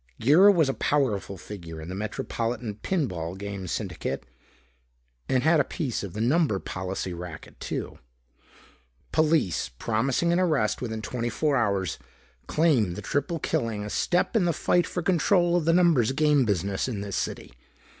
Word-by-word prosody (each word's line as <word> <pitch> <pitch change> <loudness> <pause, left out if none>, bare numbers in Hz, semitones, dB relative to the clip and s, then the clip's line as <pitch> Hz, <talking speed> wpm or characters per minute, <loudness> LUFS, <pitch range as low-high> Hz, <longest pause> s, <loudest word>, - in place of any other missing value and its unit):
Girra 165 - +7
was 165 -7 +3
a 135 - 0
powerful 110 -11 0
figure 85 -4 -8
in 80 - -8
the 90 - -5
metropolitan 110 +2 -3
pin 155 - -1
ball 85 -4 -5
game 100 -1 -6
syndicate - - -4 1.0
and 130 -1 +2
had 160 +1 +4
a - - +5
piece 140 -10 -3
of 100 -4 -6
the 105 - -5
number 135 - +2
policy 95 0 -4
racket 85 -2 -9
too. - - -5 1.1
"Police, 155 - +2
promising 125 - 0
an 175 - +2
arrest 150 - +1
within 110 -3 -4
twenty 120 +2 -2
four 145 +5 0
hours, 100 - 0 0.5
claim 130 - +2
the 105 - -7
triple 145 - -1
killing 115 -7 -2
a 105 - -6
step 175 - +1
in 205 -5 +3
the 170 - +2
fight 175 +3 +2
for 180 - -3
control 175 0 +3
of 175 -3 +1
the 165 - +4
numbers 165 -9 +4
game 150 -2 +3
business 100 0 -1
in 110 -6 -3
this 100 -1 -4
city. - - -4
120 Hz, 165 wpm, -26 LUFS, 100-160 Hz, 1.1 s, Girra